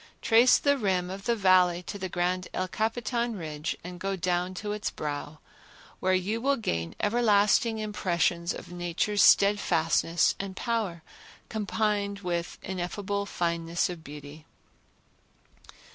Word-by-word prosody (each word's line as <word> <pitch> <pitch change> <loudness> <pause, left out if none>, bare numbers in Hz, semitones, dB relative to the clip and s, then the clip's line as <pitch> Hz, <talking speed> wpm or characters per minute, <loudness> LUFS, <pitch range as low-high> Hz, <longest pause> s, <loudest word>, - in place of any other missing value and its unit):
trace 235 +3 +5
the 285 -1 +2
rim 185 -4 0
of 195 +1 -7
the 235 - +2
Valley 185 -3 +4
to 200 - -7
the 190 -1 -4
grand 180 +1 -1
El 185 - -1
Capitan 235 +3 -1
ridge 155 -3 -4
and 180 0 -8
go 195 +1 -2
down 180 0 -1
to 205 +2 -4
its 210 0 -2
brow, 145 +1 -5 0.6
where 185 0 +2
you 205 +5 -1
will 280 +2 +2
gain 85 - -3
everlasting 215 0 +3
impressions 175 -5 0
of - - -8
Nature's 175 +3 0
steadfastness 170 -4 +4
and 195 -1 -5
power 210 -8 -2 0.5
combined 205 -1 -1
with 175 -2 -3
ineffable 200 +2 -3
fineness 170 -1 -1
of 170 -2 -9
beauty. 150 +1 -11
185 Hz, 130 wpm, -28 LUFS, 175-210 Hz, 0.6 s, trace